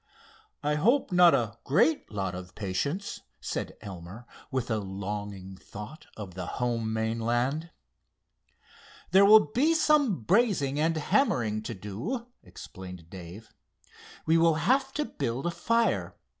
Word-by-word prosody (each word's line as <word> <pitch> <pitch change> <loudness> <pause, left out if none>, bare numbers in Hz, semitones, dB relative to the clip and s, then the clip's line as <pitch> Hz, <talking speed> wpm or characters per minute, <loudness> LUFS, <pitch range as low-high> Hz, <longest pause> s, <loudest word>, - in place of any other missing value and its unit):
"I 150 +1 +1
hope 230 - +2
not 180 -1 +7
a 115 -1 -2
great 160 +3 +2
lot 95 -3 -2
of 90 0 -8
patience," 140 - -3 0.2
said - - -4
Elmer, 100 +2 -9 0.2
with 130 -3 -2
a 110 - +1
longing 100 -1 -5
thought 105 - -10
of 100 -4 -7
the 90 -1 -5
home 115 -3 -1
mainland. 120 +7 -1 1.4
"There 195 +1 +7
will 210 -7 +7
be 305 +7 +3
some 290 - +3
brazing 175 - +2
and 165 +1 +2
hammering 120 - +1
to 110 +1 -5
do," 115 - -4 0.2
explained 90 -3 -11
Dave. 95 +4 -10 0.7
"We 165 +1 +4
will 165 -1 +4
have 265 - +2
to 300 +1 -1
build 135 - -3
a 175 - +1
fire. 230 +5 0
120 Hz, 130 wpm, -28 LUFS, 105-175 Hz, 1.4 s, not